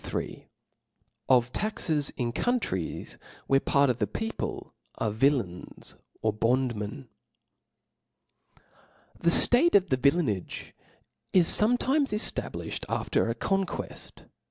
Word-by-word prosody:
III. - - -5 0.8
Of 125 -1 +3
Taxes 160 -9 0
in 120 -2 -1
Countries 170 - -2 0.3
tvhere. 135 0 +3
Part 140 0 +3
of 125 - -6
the 105 - 0
People 225 - -5 0.2
are 110 - -1
Vijlains 110 -6 -1 0.3
or 110 -1 +1
Bondmen. 120 +2 -1 2.1
nr^ - - -25
HE 245 - +6
ftate - - -1
of 195 -2 +6
villainage 130 - 0 0.6
is 180 -3 +5
forfletimes 255 +6 +3
eftablifli 210 0 -1 0.2
^ - - -7
cd - - -5
after - - 0
a 115 - -1
conqueft. 195 +9 -3
135 Hz, 110 wpm, -27 LUFS, -, 2.1 s, HE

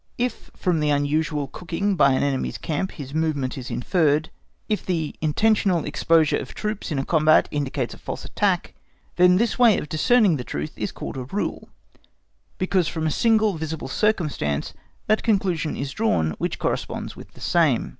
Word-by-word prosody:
If 245 +1 -3
from 180 -4 0
the 150 -1 +1
unusual 145 0 0
cooking 180 +7 -2
by 140 -5 +5
an 130 - +1
enemy's 140 -2 -1
camp 165 +4 -3
his 140 -2 -8
movement 155 -5 -1
is 125 -2 -7
inferred, 155 0 +1 0.4
if 210 -2 -1
the 165 -5 -2
intentional 185 +2 +2
exposure 160 +1 +2
of 125 - -7
troops 210 -4 -4
in 150 - -1
a 135 - -1
combat 155 -1 +4
indicates 140 -3 -2
a - - -13
false - - -6
attack, - - 0 0.4
then 180 0 +6
this 230 +5 +1
way 235 -4 +6
of 150 - -5
discerning 200 - +3
the 125 - -5
truth 75 -9 -4
is - - -3
called 130 0 -7
rule, 205 - -3 0.9
because 185 -2 +1
from 160 -2 -3
a 155 - +1
single 220 +2 +3
visible 160 -1 -4
circumstance 150 - 0 0.3
that 215 +1 +2
conclusion 190 -8 0
is 140 0 -3
drawn 145 - +1
which - - -2
corresponds - - -3
with - - -13
the - - -16
same. - - +2
160 Hz, 170 wpm, -23 LUFS, 145-195 Hz, 0.9 s, then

